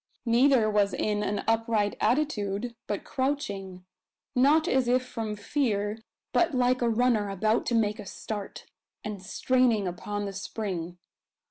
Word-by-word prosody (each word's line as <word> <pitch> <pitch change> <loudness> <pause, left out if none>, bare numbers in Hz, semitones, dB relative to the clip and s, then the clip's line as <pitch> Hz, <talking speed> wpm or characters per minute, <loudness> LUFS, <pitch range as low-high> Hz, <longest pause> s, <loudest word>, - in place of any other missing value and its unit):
Neither 240 0 +4
was 205 -2 +2
in 210 -1 0
an 205 0 -1
upright 225 -2 +1
attitude, 235 -4 0
but 205 - -3
crouching 200 -10 -3 0.5
not 295 +6 +4
as 260 -6 +2
if 255 +1 +2
from 225 -4 -4
fear, 210 -3 -1 0.3
but 335 -4 +2
like 255 0 +2
a 240 - +2
runner 225 -3 +2
about 215 +4 +1
to 240 - +1
make 215 -1 +1
a - - -8
start, 205 0 -6 0.4
and 210 -3 -5
straining 230 +1 +2
upon 205 +4 -4
the 200 - -5
spring. 190 -3 -4
220 Hz, 140 wpm, -28 LUFS, 205-250 Hz, 0.5 s, Neither